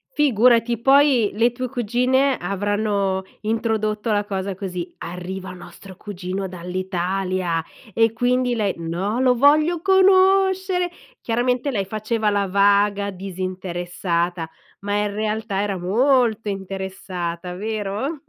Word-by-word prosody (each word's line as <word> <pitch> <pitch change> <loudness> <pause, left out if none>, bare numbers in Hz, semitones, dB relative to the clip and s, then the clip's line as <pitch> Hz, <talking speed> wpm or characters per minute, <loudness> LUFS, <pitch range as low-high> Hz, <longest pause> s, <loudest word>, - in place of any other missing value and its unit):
Figurati, 240 -3 +3
poi 270 -4 +5
le 230 +4 +2
tue 255 +1 -4
cugine 255 +3 +1
avranno 200 0 -1 0.2
introdotto 220 0 -1
la 205 -1 +1
cosa 195 -1 -3
così: 180 -2 -5
“Arriva 185 +2 -6
nostro 185 +1 -12
cugino 190 0 -5
dall'Italia”, 180 -1 -2 0.3
e 225 +1 +3
quindi 245 +1 +1
lei: 210 -4 0
"No, 175 +7 -2
lo 255 -1 +4
voglio 305 +6 +4
conoscere!” 380 -1 +4 0.3
Chiaramente 245 +3 0
lei 200 -6 -1
faceva 215 +2 -1
la 200 -1 0
vaga 200 +1 +2
disinteressata, 180 -2 -3 0.3
ma 205 +1 -2
in 205 0 0
realtà 215 -1 -2
era 200 -2 -2
molto 225 +3 +2
interessata! 190 -3 -5
Vero? 215 - -3
205 Hz, 110 wpm, -22 LUFS, 190-245 Hz, 0.3 s, poi